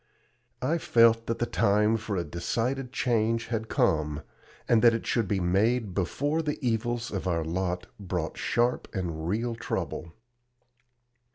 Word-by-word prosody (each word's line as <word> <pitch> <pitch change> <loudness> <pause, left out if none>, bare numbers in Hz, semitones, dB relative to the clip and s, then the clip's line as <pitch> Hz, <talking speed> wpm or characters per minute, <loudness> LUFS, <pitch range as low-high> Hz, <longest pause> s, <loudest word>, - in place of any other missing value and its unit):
I 160 +6 +1
felt 115 -4 +4
that 115 - -1
the 120 - 0
time 105 0 +2
for 110 -2 -3
a 85 - 0
decided 120 - -2
change 115 -3 0
had 110 -1 -2
come, 75 -1 +1 0.4
and 115 -2 +4
that 115 -1 +6
it 115 - -4
should 115 -4 +1
be 100 0 0
made 100 +4 +1
before 145 - 0
the 150 -2 -2
evils 120 -1 -1
of 95 -2 -3
our 85 -2 0
lot 90 +2 -2
brought 90 -4 -3
sharp 120 +1 0
and 85 -4 -3
real 115 +6 -1
trouble. 85 -6 -4
110 Hz, 150 wpm, -28 LUFS, 90-120 Hz, 0.4 s, that